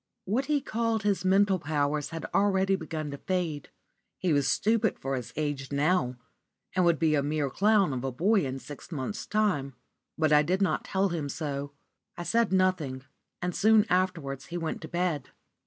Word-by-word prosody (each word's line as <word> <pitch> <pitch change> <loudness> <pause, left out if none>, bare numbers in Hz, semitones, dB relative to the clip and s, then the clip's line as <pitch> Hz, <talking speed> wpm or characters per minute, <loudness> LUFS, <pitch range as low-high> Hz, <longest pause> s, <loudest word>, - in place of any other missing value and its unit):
What 235 +8 0
he 295 0 +1
called 230 -3 -1
his 200 -3 +1
mental 195 0 +3
powers 150 -1 -1
had 165 -1 -5
already 195 -1 +3
begun 155 -4 -5
to 140 - -7
fade. 170 -6 -2 0.5
He 180 -4 +1
was 145 -2 +2
stupid 220 0 +2
for 135 0 -3
his 125 -3 -5
age 145 -3 -3
now, 145 -2 +1 0.6
and 185 - +3
would 170 -2 +4
be 155 +1 +2
a 145 - +3
mere 145 -1 -1
clown 200 -4 +3
of 125 -1 -3
a 135 - -1
boy 195 - +2
in 135 -1 -3
six 145 +4 -10
months' 155 +7 -4
time. 180 -12 0 0.4
But 155 -2 +3
I 150 - +7
did 180 +5 0
not 195 - 0
tell 195 0 +1
him 160 -5 -3
so. 140 -1 -4 0.4
I 175 - -4
said 230 +3 +1
nothing; 185 -9 +1 0.4
and 180 -1 -2
soon 220 0 +5
afterwards 180 -7 0
he 175 - -4
went 165 -2 -3
to 160 - -7
bed. 175 -6 -1
170 Hz, 185 wpm, -28 LUFS, 145-195 Hz, 0.6 s, I